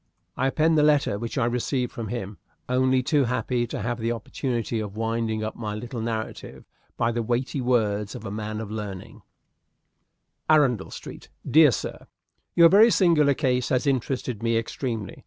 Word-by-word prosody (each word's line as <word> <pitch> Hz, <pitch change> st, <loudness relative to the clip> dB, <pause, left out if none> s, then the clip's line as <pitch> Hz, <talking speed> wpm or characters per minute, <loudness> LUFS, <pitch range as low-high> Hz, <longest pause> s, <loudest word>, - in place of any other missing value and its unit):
I 130 Hz, -, +1 dB
append 155 Hz, +3 st, +2 dB
the -, -, +5 dB
letter 145 Hz, -9 st, +3 dB
which 115 Hz, +3 st, -5 dB
I 120 Hz, -, +2 dB
received 125 Hz, +1 st, -1 dB
from 115 Hz, -2 st, -6 dB
him, 105 Hz, -3 st, -5 dB, 0.3 s
only 130 Hz, 0 st, +2 dB
too 145 Hz, +1 st, +2 dB
happy 120 Hz, 0 st, -1 dB
to 105 Hz, -, -5 dB
have 120 Hz, +1 st, -2 dB
the 115 Hz, +1 st, -1 dB
opportunity 120 Hz, 0 st, -3 dB
of 105 Hz, -1 st, -6 dB
winding 115 Hz, -1 st, -1 dB
up 110 Hz, -, -4 dB
my 105 Hz, -3 st, -4 dB
little 120 Hz, +2 st, -6 dB
narrative 110 Hz, -1 st, -5 dB, 0.3 s
by 115 Hz, 0 st, +1 dB
the 120 Hz, 0 st, -1 dB
weighty 125 Hz, +4 st, -1 dB
words 105 Hz, -5 st, 0 dB
of 110 Hz, -, -8 dB
a 100 Hz, -, -5 dB
man 110 Hz, +1 st, -4 dB
of 105 Hz, -2 st, -7 dB
learning: 105 Hz, 0 st, -7 dB, 1.3 s
"Arundel 135 Hz, -10 st, +3 dB
Street. -, -, -10 dB, 0.2 s
"Dear 155 Hz, -1 st, +7 dB
Sir 120 Hz, -, -4 dB, 0.5 s
Your 170 Hz, -1 st, +8 dB
very 205 Hz, +7 st, +7 dB
singular 160 Hz, -9 st, +4 dB
case 125 Hz, -3 st, 0 dB
has 130 Hz, +1 st, +1 dB
interested 130 Hz, -4 st, -1 dB
me 115 Hz, 0 st, +1 dB
extremely. 115 Hz, -2 st, -4 dB
120 Hz, 170 wpm, -25 LUFS, 110-130 Hz, 1.3 s, Your